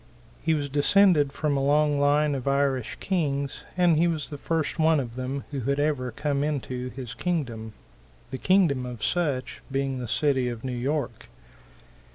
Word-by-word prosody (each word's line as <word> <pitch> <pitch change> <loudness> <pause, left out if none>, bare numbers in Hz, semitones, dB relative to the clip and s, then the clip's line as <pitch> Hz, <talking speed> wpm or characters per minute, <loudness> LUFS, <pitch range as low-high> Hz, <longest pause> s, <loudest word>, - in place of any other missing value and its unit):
He 160 0 +2
was 145 -2 -2
descended 150 +1 +4
from 150 0 -1
a 135 - 0
long 145 +1 +3
line 145 +1 +3
of 135 -1 -4
Irish 135 -4 0
Kings, 140 -7 -1
and 175 -3 +4
he 170 +2 +4
was 160 -4 -2
the 145 - -5
first 165 +1 -2
one 160 -1 +4
of 120 -3 -5
them 130 +2 -3
who 140 - -3
had 140 +3 -1
ever 145 -4 0
come 140 +4 -1
into 130 -4 -3
his 125 -1 -7
kingdom 120 -11 -3 0.6
the 130 - -4
kingdom 175 -9 +3
of 120 -3 -7
such 145 -8 -1
being 135 -1 -1
the 125 - -4
city 130 0 +1
of 115 -2 -6
New 130 -1 -3
York. 125 -2 -3
140 Hz, 175 wpm, -26 LUFS, 130-150 Hz, 0.6 s, descended